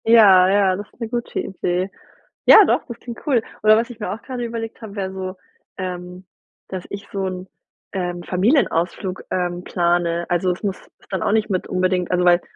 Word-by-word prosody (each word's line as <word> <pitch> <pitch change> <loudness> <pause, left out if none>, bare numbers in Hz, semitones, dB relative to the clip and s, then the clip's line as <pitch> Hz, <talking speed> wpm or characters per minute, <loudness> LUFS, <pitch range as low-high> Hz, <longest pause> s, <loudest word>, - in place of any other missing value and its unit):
Ja, 200 -5 +7
ja, 195 -1 +3
das 205 +1 -7
ist - - -29
'ne 230 -2 -4
gute 240 0 -3
Idee. 185 0 -2 0.6
Ja - - +10
doch, - - +1
das 235 -1 -8
klingt 235 -2 -9
cool. 265 -7 +3 0.2
Oder 215 0 +7
was 230 +2 0
ich 240 -2 -10
mir 210 -4 -3
auch 210 - -6
gerade 250 -2 -5
überlegt 230 0 -5
habe, 215 -2 -9
wäre 190 -2 -3
so, 190 0 -5 0.4
ähm, 180 0 -6 0.4
dass 185 -2 -5
ich 200 0 -7
so 195 -1 -2
'n, 185 0 -5 0.5
ähm, 175 -2 -3
Familienausflug, 185 - 0
ähm, 180 -1 -1
plane. 175 -1 +1
Also, 175 +1 +1
es 180 - -5
muss 195 -3 -2 0.3
dann 190 -3 -2
auch - - +1
nicht 215 0 +1
mit 185 -2 -1
unbedingt 185 -1 0
also 180 0 +2
weil 175 0 +5
190 Hz, 195 wpm, -21 LUFS, 180-215 Hz, 0.6 s, Ja